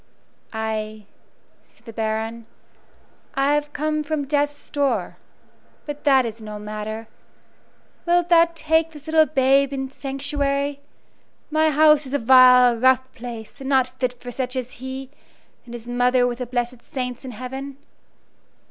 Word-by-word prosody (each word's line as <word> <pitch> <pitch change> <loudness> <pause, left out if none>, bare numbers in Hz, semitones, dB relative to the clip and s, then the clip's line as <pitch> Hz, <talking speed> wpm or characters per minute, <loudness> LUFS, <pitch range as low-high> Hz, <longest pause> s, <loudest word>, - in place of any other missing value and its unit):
"Ay," 215 -1 -4 0.6
said - - -27
the 230 - -9
Baron, 220 +1 -3 0.9
"I 275 +1 +2
have 295 0 -1
come 305 +1 -1
from 300 -1 -2
death's 290 0 -2
door. 285 -2 -1 0.7
But 295 0 -7
that 265 -3 +5
is 225 0 -6
no 210 -1 -7
matter. 215 +1 -6 1.0
Wilt 350 0 +2
thou 335 -1 +6
take 320 0 +1
this 295 -1 -12
little 315 -1 +4
babe 275 -1 +3
into 270 -1 -4
sanctuary? 280 +1 -2 0.7
My 315 +1 +3
house 300 -1 +4
is 265 - -3
a - - +4
vile, 250 -1 +7
rough 260 +1 +3
place, 230 +1 -9
and 270 0 -5
not 260 -1 +1
fit 255 -1 0
for 245 0 -8
such 255 +1 -3
as 255 -1 -3
he, 260 0 -6 0.5
and 240 -1 -9
his 235 0 -10
mother 245 +1 +2
with 245 0 -2
the 250 - -4
blessed 245 0 -3
saints 250 -1 -5
in 260 - -7
heaven." 265 +3 -7
260 Hz, 150 wpm, -22 LUFS, 240-285 Hz, 1.0 s, vile